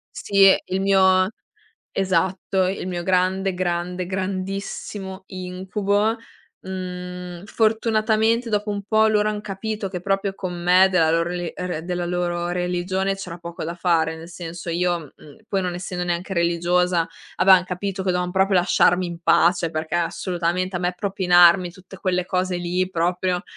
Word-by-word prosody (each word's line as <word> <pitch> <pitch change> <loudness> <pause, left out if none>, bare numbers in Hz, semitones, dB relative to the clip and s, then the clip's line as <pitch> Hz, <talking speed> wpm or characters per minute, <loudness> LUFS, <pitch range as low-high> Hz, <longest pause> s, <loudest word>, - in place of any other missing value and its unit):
Sì 195 -1 +5
il 190 +1 -2
mio 190 -1 +4 0.6
esatto. 190 0 0
Il 185 0 -3
mio 175 -1 -3
grande, 190 +1 +1
grande, 180 0 -2
grandissimo 190 +1 -4
incubo. 195 +4 -1 0.5
Mhmm. 180 -1 -6
Fortunatamente 220 +1 +1
dopo 210 0 0
un 205 -1 -3
po' 220 +2 +3
loro 215 -1 +2
han 210 -1 -2
capito 210 0 -4
che 180 -1 -5
proprio 195 +1 -1
con 185 -2 -5
me 180 +2 +5
della 165 -4 +3
loro 165 +1 +2
re 175 -1 -4
re 180 -3 -4
della 175 0 -2
loro 175 0 -1
religione 180 +2 -1
c'era 180 -3 -7
poco 170 0 -8
da 170 +2 -4
fare. 165 -2 +1
Nel 165 +1 -10
senso 170 0 -8
io, 170 -3 -1
mh, 145 - -16
poi 195 -1 0
non 180 -1 -2
essendo 180 0 -4
neanche 175 +2 -2
religiosa, 175 0 +1 0.3
avevan 190 -1 +6
capito 190 +1 -4
che 190 - 0
dovevan 180 0 -1
proprio 190 0 +3
lasciarmi 180 0 +3
in 170 -1 -7
pace 170 0 +3
perché 155 +1 -4
assolutamente 175 +1 -1
a - - 0
me 180 0 0
propinarmi 180 -2 +4
tutte 185 +2 -14
quelle 180 -1 -1
cose 185 -1 -1
lì 180 +1 -1
proprio 180 +1 0
185 Hz, 155 wpm, -22 LUFS, 175-195 Hz, 0.6 s, avevan